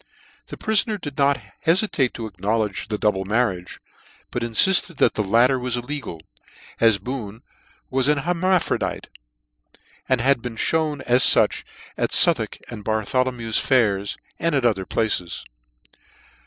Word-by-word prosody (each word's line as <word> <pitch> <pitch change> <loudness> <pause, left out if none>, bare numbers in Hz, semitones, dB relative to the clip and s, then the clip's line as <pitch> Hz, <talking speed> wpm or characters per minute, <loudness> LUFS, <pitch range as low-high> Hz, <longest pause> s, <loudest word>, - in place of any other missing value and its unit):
The - - -9
prifoner 215 -1 0
did 145 -5 -7
not 140 -1 +3 0.2
heficate 165 - +1
to 115 - -5
acknowledge 105 -1 -2
the 105 - -3
double 100 -2 0
marriage, 95 -4 -2 0.5
but 120 - -3
infilled 165 +8 +4
that - - +3
the - - -1
latter 120 +6 +3
was 125 -1 -1
illegal, 120 - -6 0.6
as 115 -3 +4
Boone 110 0 -7 0.5
was 130 0 +1
an 150 0 +3
hermaphrodite, 180 +4 -1 1.0
and 130 -2 +2
had 130 0 +2
been 120 -2 -7
Ihewn 155 -2 0
as 125 0 +3
fuch - - +4 0.3
at - - -1
Southwark - - +2
and 110 -3 -9
Bartholo 110 +5 0
mew 115 -2 -7
fairs, 105 -5 +1 0.2
and 165 -1 0
at 135 -3 0
other 95 -5 0
places. 90 - -2
120 Hz, 140 wpm, -22 LUFS, 105-140 Hz, 1.0 s, infilled